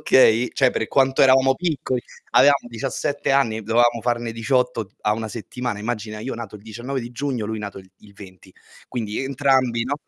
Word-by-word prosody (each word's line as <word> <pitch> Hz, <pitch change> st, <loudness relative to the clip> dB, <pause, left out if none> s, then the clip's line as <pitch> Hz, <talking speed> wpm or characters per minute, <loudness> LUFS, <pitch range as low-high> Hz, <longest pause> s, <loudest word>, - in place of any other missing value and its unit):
okay, 125 Hz, -2 st, +5 dB
cioè 130 Hz, -2 st, +3 dB
per 110 Hz, -, -2 dB
quanto 135 Hz, -1 st, +3 dB
eravamo 135 Hz, 0 st, +5 dB
piccoli: 145 Hz, -6 st, -2 dB, 0.3 s
avevamo 140 Hz, -2 st, +5 dB
17 120 Hz, +5 st, -2 dB
anni, 115 Hz, -5 st, +2 dB
dovevamo 120 Hz, +2 st, +2 dB
farne 120 Hz, -1 st, -1 dB
18 115 Hz, -2 st, 0 dB
a 105 Hz, -, +2 dB
1 110 Hz, 0 st, -3 dB
settimana, 120 Hz, +1 st, -5 dB
immagina, 110 Hz, -1 st, -4 dB
io 130 Hz, +4 st, -4 dB
nato 110 Hz, -2 st, -7 dB
il 100 Hz, -, -17 dB
19 120 Hz, +5 st, -5 dB
di 120 Hz, 0 st, -7 dB
giugno, 125 Hz, -4 st, -3 dB
lui 110 Hz, 0 st, -3 dB
nato 100 Hz, -2 st, -6 dB
il 95 Hz, 0 st, -15 dB
il 105 Hz, -, -18 dB
20. 95 Hz, -3 st, -14 dB, 0.4 s
Quindi 110 Hz, -2 st, -3 dB
entrambi, 130 Hz, -3 st, +1 dB
no 135 Hz, +3 st, -1 dB
120 Hz, 180 wpm, -22 LUFS, 110-130 Hz, 0.4 s, okay